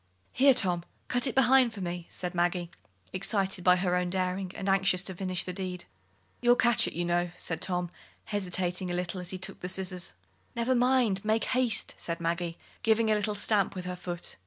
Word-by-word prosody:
"Here, 270 +1 +5
Tom, 180 -6 +2 0.3
cut 245 +1 +1
it 255 - -3
behind 260 -2 +5
for 200 - -7
me," 175 -1 -4
said 180 0 -5
Maggie, 175 0 0 0.4
excited 190 -1 0
by 180 0 +6
her 180 0 0
own 180 0 0
daring, 185 0 -2
and 195 - -5
anxious 195 -1 +3
to 190 - 0
finish 185 0 -2
the 180 - -5
deed. 180 -1 -4 0.6
"You'll 245 0 +5
catch 240 -2 +4
it, - - -5
you 175 +1 -1
know," 175 0 +1
said 165 -1 -1
Tom, 180 -2 -1 0.3
hesitating 185 -2 0
a 175 - -2
little 180 +1 -3
as 175 - -5
he 185 - -4
took 190 +1 -5
the 180 - -4
scissors. 185 - -2 0.4
"Never 235 +2 +1
mind 245 -5 +2
make 220 +1 +1
haste!" 255 -3 +1
said 170 0 -4
Maggie, 170 0 -2 0.2
giving 220 0 +3
a - - +5
little 210 0 0
stamp 200 -1 +1
with 180 -1 -5
her 180 0 -4
foot. 175 -1 -3
185 Hz, 200 wpm, -29 LUFS, 180-215 Hz, 0.6 s, by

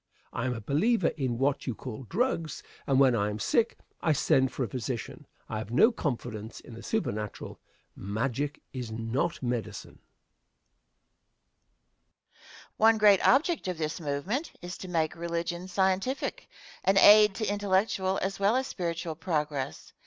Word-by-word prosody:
I 120 +2 -2
am 125 - -1
a 115 - -6
believer 175 - +2
in 130 -5 -2
what 140 +3 0
you 125 - -2
call 125 +1 -7
"drugs," 175 - -1 0.2
and 135 -1 +3
when 130 -3 +5
I 105 -1 +1
am 105 - -4
sick 225 - +1 0.2
I 160 - +3
send 130 -2 +2
for 130 - -2
a - - -1
physician. 120 +1 -5 0.2
I 110 - -3
have 110 - -6
no 155 - +5
confidence 120 - -4
in - - -13
the 115 - -9
supernatural. 110 - -3 0.4
Magic 125 +8 -3
is 125 -4 -5
not 115 +9 -2
medicine. 115 -4 -4
Question. - - -41 2.7
One 225 +1 +5
great 205 -3 +6
object 310 - +3
of 180 -2 -2
this 155 +2 -3
movement, 170 - -2
is 180 +1 -5
to 185 - -7
make 165 -3 0
religion 170 +1 -3
scientific 190 +7 -1 0.3
an 195 +1 +3
aid 210 0 +8
to 220 - -2
intellectual 195 -1 +1
as 195 +1 -2
well 200 +4 +3
as 260 +1 +1
spiritual 170 -6 -3
progress. 150 -5 -3
160 Hz, 155 wpm, -29 LUFS, 125-195 Hz, 2.7 s, aid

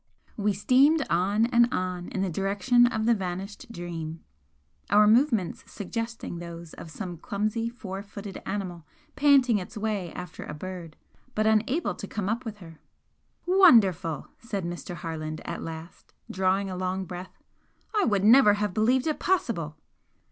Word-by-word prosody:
We 205 -1 +1
steamed 270 - +4
on 195 +6 +2
and 240 0 +4
on 180 -1 -2
in 190 - -2
the 195 - 0
direction 200 +7 +3
of 220 -2 -1
the 235 - +5
vanished 195 +2 -5
'Dream,' 165 -4 -6 0.7
our 210 +1 +6
movements 225 - +3
suggesting 230 -3 -5
those 170 -1 -9
of 165 - -10
some 175 0 -6
clumsy 215 +6 -2
four 195 -5 -7
footed 200 -1 -8
animal 185 -4 -4 0.3
panting 270 -6 +5
its 190 +5 -8
way 210 -5 -2
after 180 -2 -7
a 150 - -7
bird, 175 -1 -7 0.4
but 215 - +1
unable 220 +9 +2
to 200 - -8
come 205 -1 -3
up 235 +3 -2
with 220 -2 -5
her. 165 -5 -13 0.7
"Wonderful!" 225 - +5
said 200 -6 -4
Mr. 175 +1 -5
Harland, 155 -2 -5
at - - -4
last, 165 +1 -9 0.2
drawing 190 +1 +1
a 185 - -4
long 185 +1 -2
breath, 180 +1 -8 0.6
"I 415 -3 +3
would 200 -3 +1
never 220 -1 +7
have 205 -2 -1
believed 245 +5 +2
it 310 -2 -1
possible!" 215 - 0
200 Hz, 155 wpm, -27 LUFS, 175-230 Hz, 0.7 s, never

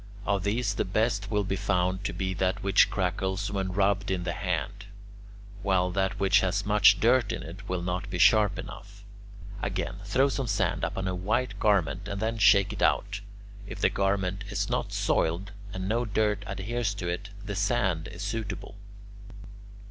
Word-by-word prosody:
Of 100 -2 0
these 105 +1 0
the - - 0
best 105 +1 0
will 105 -1 +1
be 95 0 -2
found 95 -1 0
to - - 0
be 95 -1 -2
that 95 0 -1
which 100 0 +5
crackles 95 +1 -1
when 95 -2 -2
rubbed 100 +1 +1
in 95 -2 -1
the 85 -1 -2
hand, 95 +2 -3 0.8
while 95 -3 +1
that 95 +1 -1
which 95 -1 +4
has 95 +2 0
much 105 0 +5
dirt 120 -1 +3
in - - -4
it 85 +5 -10
will 90 -1 -2
not 90 +2 -3
be 90 - -3
sharp 105 +4 +5
enough. - - -9 0.6
Again: - - -3
throw 125 +8 +2
some 135 -2 -2
sand - - 0
upon 95 0 -2
a 95 - -1
white 105 +7 -1
garment 95 -2 +1
and 100 0 -4
then 110 +1 -1
shake 100 +1 +5
it - - -7
out; 100 0 +1 0.5
if - - -7
the - - +3
garment 95 -1 0
is 100 -1 -2
not - - -1
soiled 90 +5 0 0.2
and 95 0 -4
no 115 +4 0
dirt 105 -1 0
adheres 100 +2 -2
to 90 -3 -4
it, 90 +3 -3 0.2
the 100 - -4
sand 95 -5 0
is 90 - -8
suitable. 105 -2 -4 0.6
2. - - -14
100 Hz, 180 wpm, -28 LUFS, 95-105 Hz, 0.8 s, which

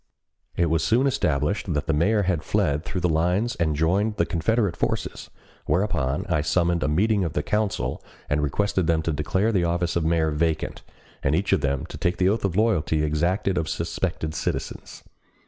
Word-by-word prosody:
It 85 - +2
was 80 -1 +1
soon 115 +10 +3
established 80 - 0
that 75 - -1
the 80 - 0
mayor 100 +8 +2
had 90 -4 0
fled 75 0 0
through 95 0 -4
the 90 - +2
lines 90 +8 +1
and 80 -3 +1
joined 95 +8 +1
the - - +1
Confederate 100 +2 0
forces, - - -3 0.4
whereupon 75 -8 0
I 75 - +1
summoned 85 +2 +1
a - - +1
meeting 100 +6 +2
of 80 -3 -2
the 75 - -1
council 105 -2 -1 0.3
and 75 +1 +1
requested 95 +4 0
them 80 -1 +2
to 80 - 0
declare 95 +9 0
the 95 -5 +1
office 85 0 0
of 85 - +1
mayor 80 -1 +2
vacant, 80 +1 -1 0.4
and 70 +3 +1
each 95 +4 +1
of - - +2
them 70 -2 -1
to - - -9
take 90 0 0
the 95 0 +3
oath 110 +3 0
of 95 -3 -1
loyalty 90 -8 +2
exacted 85 +5 0
of 80 - -3
suspected 80 0 -2
citizens. - - -4
85 Hz, 190 wpm, -24 LUFS, 75-100 Hz, 0.4 s, soon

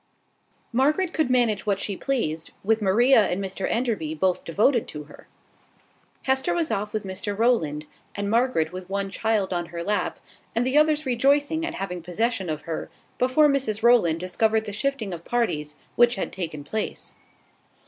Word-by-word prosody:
Margaret 300 +9 +2
could 315 -5 +1
manage 235 -5 +2
what 200 -1 +1
she 200 0 -3
pleased, 175 - -2
with 220 +2 +2
Maria 220 +4 +5
and 180 - -2
Mr 195 0 -3
Enderby 215 -10 -1
both 185 +3 0
devoted 220 - +2
to 150 -1 -7
her. 145 - -16 1.0
Hester 265 +6 +1
was 330 -3 0
off 210 -1 -2
with 215 -1 -3
Mr 200 +1 -4
Rowland, 160 -11 +1 0.3
and 205 0 -2
Margaret 230 -7 +1
with 185 0 -8
one 195 0 -2
child 210 -2 0
on 175 -1 -2
her 170 0 -6
lap, 210 +3 -1 0.4
and 235 +2 +1
the 260 +2 0
others 305 0 +4
rejoicing 285 +5 +2
at 335 0 -3
having 180 -2 -4
possession 190 +3 -1
of 155 -1 -3
her, 165 -1 -5 0.3
before 260 +5 +4
Mrs 255 -7 0
Rowland 225 -10 +4
discovered 220 +5 +1
the 205 - -5
shifting 225 -3 -2
of 170 -1 -7
parties 155 -12 -1 0.2
which 240 0 +5
had 195 - -4
taken 160 -5 -5
place. 215 +8 -4
215 Hz, 170 wpm, -25 LUFS, 185-250 Hz, 1.0 s, Maria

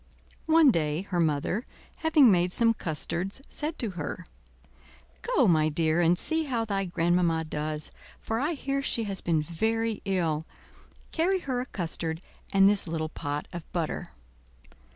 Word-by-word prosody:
One 320 -3 +6
day 155 -2 0
her 185 -3 -2
mother, 165 - 0 0.3
having 305 -7 +5
made 180 -1 +2
some 230 -1 +3
custards, 180 - -3
said 310 +2 -4
to 225 -4 -1
her: 175 +1 -5 1.0
"Go, 310 - +2
my 155 -3 +4
dear, 160 +2 +1
and 175 +1 +4
see 320 - +1
how 240 -5 -1
thy 195 -2 -1
grandmamma 170 -1 +1
does, 155 0 -4 0.3
for 225 0 -2
I 295 +6 0
hear 275 0 -2
she 235 -4 0
has 195 -3 -3
been 160 -3 +1
very 220 +7 -1
ill; 165 -5 0 0.6
carry 365 +3 +1
her 255 -4 -2
a 255 - -6
custard 165 -4 -3 0.3
and 195 0 +6
this 200 -2 +3
little 160 -1 -2
pot 145 -2 -4
of 170 -2 -8
butter." 165 -3 -2
180 Hz, 150 wpm, -28 LUFS, 160-235 Hz, 1.0 s, One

